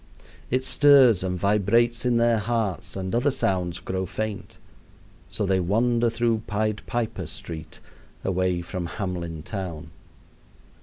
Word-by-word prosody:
It 130 +1 0
stirs 135 -9 +6
and 90 -1 -2
vibrates 115 +6 +2
in 120 -1 +3
their 115 -1 +3
hearts 110 -3 -2
and 95 -1 -4
other 125 +5 +2
sounds 90 -8 -1
grow 95 0 -3
faint. 110 0 -5 0.7
So 105 - -2
they 95 -1 +2
wander 115 +6 +2
through 115 -1 0
Pied 105 0 -1
Piper 120 -3 -2
Street 80 -1 -8 0.4
away 95 -1 0
from 90 0 -4
Hamelin 85 -5 -4
town. 90 -5 -6
105 Hz, 125 wpm, -25 LUFS, 90-115 Hz, 0.7 s, stirs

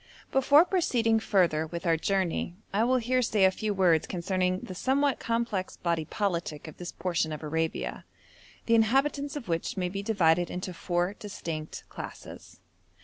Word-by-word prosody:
Before 285 +4 +6
proceeding 235 - +2
further 175 -8 +2
with 170 +2 -6
our 165 -1 +4
journey, 180 0 -1 0.2
I 210 +3 +3
will 255 +1 +3
here 255 +1 +1
say 215 -5 +3
a 190 - +5
few 215 +2 -2
words 180 -5 +3
concerning 185 +1 -1
the 185 - -7
somewhat 270 +7 +1
complex 230 -5 -2
body 170 -2 -1
politic 170 -6 -2
of 155 - -10
this 175 0 -6
portion 165 -2 -1
of 155 +1 -6
Arabia, 160 +1 -2 0.6
the 230 - +2
inhabitants 275 +6 +2
of 285 -7 -6
which 165 +1 -2
may 180 -1 0
be 195 +2 -4
divided 175 -5 +2
into 180 0 -5
four 175 +2 -1
distinct 165 -7 -6
classes. - - -10
190 Hz, 160 wpm, -28 LUFS, 170-230 Hz, 0.6 s, Before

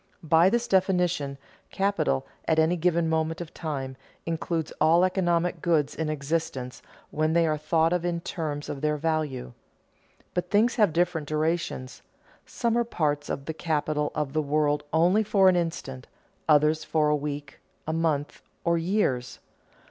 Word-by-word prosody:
By 165 +3 +5
this 235 +3 0
definition, 180 -7 +1 0.3
capital, 195 - 0 0.2
at 160 - +2
any 160 +2 +3
given 170 -1 +1
moment 160 0 0
of 170 -2 -7
time, 135 -5 -4 0.3
includes 165 -1 -2
all 165 +3 +5
economic 175 -2 0
goods 155 -4 +1
in 160 -1 -3
existence, 140 -3 -3 0.3
when 155 +1 0
they 170 0 +4
are 155 -1 +1
thought 160 +2 +1
of 180 -1 0
in 175 -1 -1
terms 150 -4 -4
of 140 - -5
their 150 0 +1
value. 150 - -2 0.8
But 180 0 -2
things 220 +5 +3
have 210 -6 +4
different 165 -2 0
durations, 155 -4 -2 0.5
some 235 -2 -1
are - - +3
parts 150 -10 -1
of 140 - -4
the 160 - -3
capital 150 -2 -1
of 145 -2 -2
the 155 - +1
world 150 0 +1
only 175 +7 +4
for 200 -2 +3
an 185 - +3
instant, 150 -7 -3 0.4
others 155 +1 +4
for 155 -1 +1
a 150 - +3
week, 145 -1 -5 0.3
a 160 - -1
month, 160 -3 -1 0.2
or 170 0 +2
years. 165 -9 0
160 Hz, 155 wpm, -26 LUFS, 150-175 Hz, 0.8 s, By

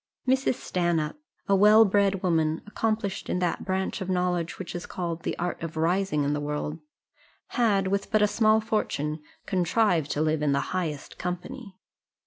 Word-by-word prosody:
Mrs. 260 0 +2
Stanhope, 170 - -1 0.3
a 200 - +4
well 210 +3 +7
bred 200 -1 +2
woman, 160 -3 +1
accomplished 215 -1 -2
in - - 0
that 180 -1 -1
branch 190 0 -2
of 190 - -4
knowledge 180 -2 0
which 190 - -6
is 175 0 -6
called 170 -2 -4
the - - -3
art 175 0 -3
of 165 -1 -5
rising 170 -1 +1
in 145 +1 0
the 145 - -1
world, 150 +2 -3 0.7
had, 205 -6 +2
with 200 +1 -1
but 215 -1 +3
a - - +5
small 215 0 +3
fortune, 155 -8 -2 0.2
contrived 180 -4 +1
to 145 - -1
live 155 -1 +1
in 145 -2 +2
the 140 - -1
highest 160 -6 -4
company. 190 +5 -5
180 Hz, 170 wpm, -27 LUFS, 160-205 Hz, 0.7 s, well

